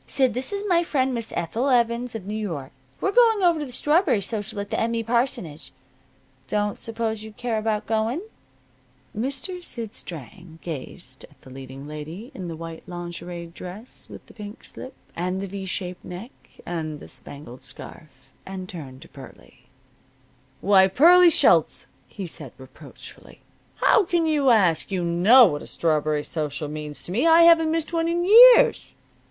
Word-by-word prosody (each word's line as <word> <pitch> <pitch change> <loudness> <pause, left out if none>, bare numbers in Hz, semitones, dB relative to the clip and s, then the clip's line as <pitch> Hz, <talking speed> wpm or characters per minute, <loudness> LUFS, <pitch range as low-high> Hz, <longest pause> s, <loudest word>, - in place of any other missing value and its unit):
Sid, 265 -4 +2
this 255 - -1
is 400 0 -2
my 345 -3 +3
friend, 265 -6 0
Miss 230 -2 -4
Ethel 230 +11 -1
Evans, 235 -1 +1
of 210 -4 -6
New 205 - -5
York. 165 -11 -5 0.3
We're 395 - 0
going 450 -3 +4
over 340 -3 +3
to 295 - -4
the - - -11
strawberry 295 - +2
social 205 +1 -4
at 200 0 -6
the - - -1
M. 230 +1 0
E. 230 - -1
parsonage. 235 - -2
I 130 0 -35
don't 205 -1 -1
suppose 225 -1 -3
you'd 220 -1 -11
care 235 -3 -2
about 215 -1 -2
going?" 225 +7 -1 0.9
Mr. 275 - -4
Sid 230 -9 -6
Strang 160 +2 -9
gazed 135 -4 -8
at 145 - -25
the 130 - -15
leading 135 +1 -10
lady 155 - -8
in 185 -8 -7
the 165 - -6
white 165 0 -8
lingerie 175 0 -7
dress 180 +7 -9
with - - -12
the - - -17
pink 210 -1 -10
slip, 260 - -8 0.2
and 180 +2 -2
the 195 - -4
V 195 0 -7
shaped 180 -1 -5
neck, 190 +8 -8 0.3
and 155 -3 -4
the - - -12
spangled 140 -3 -9
scarf, - - -10 0.4
and 190 -1 -7
turned 140 -8 -9
to - - -15
Pearlie. - - -15 0.9
"Why, 190 0 +5
Pearlie 345 - +6
Schultz!" - - +3 0.2
he 195 - -7
said 150 -6 -7
reproachfully. 130 -1 -14 0.3
"How 425 - +3
can 340 -1 +1
you 295 -4 +2
ask? 195 -7 +3
You 185 -2 -1
know 195 +10 +6
what 145 -7 -1
a - - -9
strawberry 155 -2 0
social 150 -2 -4
means 150 -1 -7
to - - -6
me! 240 - +1
I 330 +1 +7
haven't 330 -1 +6
missed 325 0 -2
one 330 0 +1
in 345 +1 0
years!" 485 +5 +7
205 Hz, 175 wpm, -24 LUFS, 165-260 Hz, 0.9 s, I